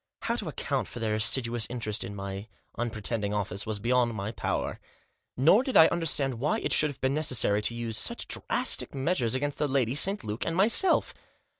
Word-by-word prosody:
How -, -, -2 dB
to -, -, -4 dB
account -, -, -3 dB
for -, -, -9 dB
their 110 Hz, -2 st, -1 dB
assiduous 115 Hz, +1 st, +1 dB
interest 115 Hz, -3 st, -4 dB
in 100 Hz, +1 st, -7 dB
my 100 Hz, +1 st, -7 dB, 0.3 s
unpretending 110 Hz, -2 st, -2 dB
office 100 Hz, 0 st, -3 dB
was 110 Hz, -1 st, -2 dB
beyond 120 Hz, +2 st, 0 dB
my 100 Hz, +1 st, -4 dB
power. 100 Hz, -3 st, -3 dB, 0.6 s
Nor 160 Hz, -, +5 dB
did 265 Hz, -1 st, 0 dB
I 160 Hz, -, +9 dB
understand 145 Hz, -7 st, -1 dB
why 145 Hz, +4 st, 0 dB
it -, -, -2 dB
should 150 Hz, -, +4 dB
have 145 Hz, -, -11 dB
been 130 Hz, +1 st, 0 dB
necessary 125 Hz, -8 st, +1 dB
to 115 Hz, +2 st, -2 dB
use 115 Hz, -2 st, -2 dB
quite -, -, -3 dB
such -, -, -6 dB
drastic -, -, 0 dB
measures 130 Hz, -4 st, 0 dB
against 145 Hz, +2 st, -3 dB
the 150 Hz, -, 0 dB
lady, 130 Hz, -3 st, 0 dB
St. 195 Hz, +8 st, +5 dB
Luke, 105 Hz, +2 st, -4 dB
and 165 Hz, -, -3 dB
myself. 225 Hz, -, +4 dB
120 Hz, 195 wpm, -27 LUFS, 110-145 Hz, 0.6 s, I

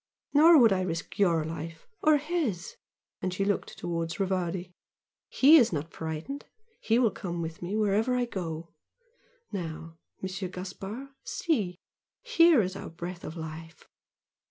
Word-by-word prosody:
Nor 320 Hz, +3 st, +8 dB
would 230 Hz, -7 st, +7 dB
I 185 Hz, -, +1 dB
risk 170 Hz, 0 st, -4 dB
YOUR 170 Hz, -5 st, +3 dB
life 165 Hz, +1 st, -6 dB, 0.2 s
or 310 Hz, -1 st, +5 dB
HIS!" 290 Hz, -, -2 dB, 0.5 s
and 185 Hz, -, -1 dB
she 195 Hz, +2 st, -1 dB
looked 200 Hz, -1 st, -1 dB
towards 165 Hz, 0 st, -3 dB
Rivardi 185 Hz, -2 st, -1 dB, 0.6 s
"HE 295 Hz, +5 st, +7 dB
is 240 Hz, -6 st, +5 dB
not 155 Hz, 0 st, -4 dB
frightened 160 Hz, -, -5 dB, 0.3 s
he 225 Hz, -, +2 dB
will 240 Hz, -4 st, +4 dB
come 175 Hz, -3 st, -5 dB
with 160 Hz, -1 st, -5 dB
me 180 Hz, +4 st, -3 dB
wherever 215 Hz, +4 st, +2 dB
I 250 Hz, -1 st, +1 dB
go! 170 Hz, -7 st, -5 dB, 0.8 s
Now, 165 Hz, -3 st, -6 dB, 0.2 s
Monsieur 190 Hz, 0 st, -4 dB
Gaspard, 195 Hz, +8 st, -7 dB
see! 205 Hz, -, -1 dB, 0.5 s
Here 335 Hz, -, +5 dB
is 185 Hz, +1 st, -3 dB
our -, -, -6 dB
breath 175 Hz, +2 st, -7 dB
of 160 Hz, -, -7 dB
life!" 160 Hz, 0 st, -8 dB
185 Hz, 145 wpm, -29 LUFS, 165-230 Hz, 0.8 s, Nor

